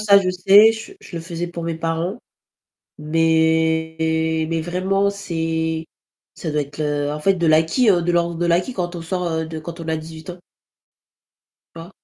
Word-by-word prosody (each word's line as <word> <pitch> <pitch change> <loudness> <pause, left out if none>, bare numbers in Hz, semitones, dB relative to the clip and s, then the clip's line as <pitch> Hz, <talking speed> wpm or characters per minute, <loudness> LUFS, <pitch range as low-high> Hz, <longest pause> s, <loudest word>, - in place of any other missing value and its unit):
ça, 200 -2 +6
je 185 - 0
sais, 195 +4 +6
je 225 - -8
je 175 - -10
le 165 - -4
faisais 170 0 -4
pour 170 -1 -7
mes 165 0 -2
parents, 165 +6 -2 0.8
mais 160 0 +1
mais 165 -1 -1
vraiment, 190 +4 0
c'est, 160 -4 -2 0.5
ça 160 - -5
doit 150 - +1
être, 145 +1 -9
heu, 145 -1 -1
en 150 - -4
fait, 195 +6 +3
de 170 -2 0
l'acquis 160 +10 +3
de 175 -3 +3
l'ordre 170 0 +1
de 175 - 0
l'acquis, 175 +9 +1
quand 180 -4 -3
on 170 - -6
sort 165 -1 -2
de 160 0 -6
quand 170 +2 -8
on 165 - -7
a 160 0 0
18 160 +1 -10
ans. 180 0 -8 1.4
Tu - - -11
vois? 170 +2 -11
165 Hz, 185 wpm, -21 LUFS, 160-180 Hz, 1.4 s, ça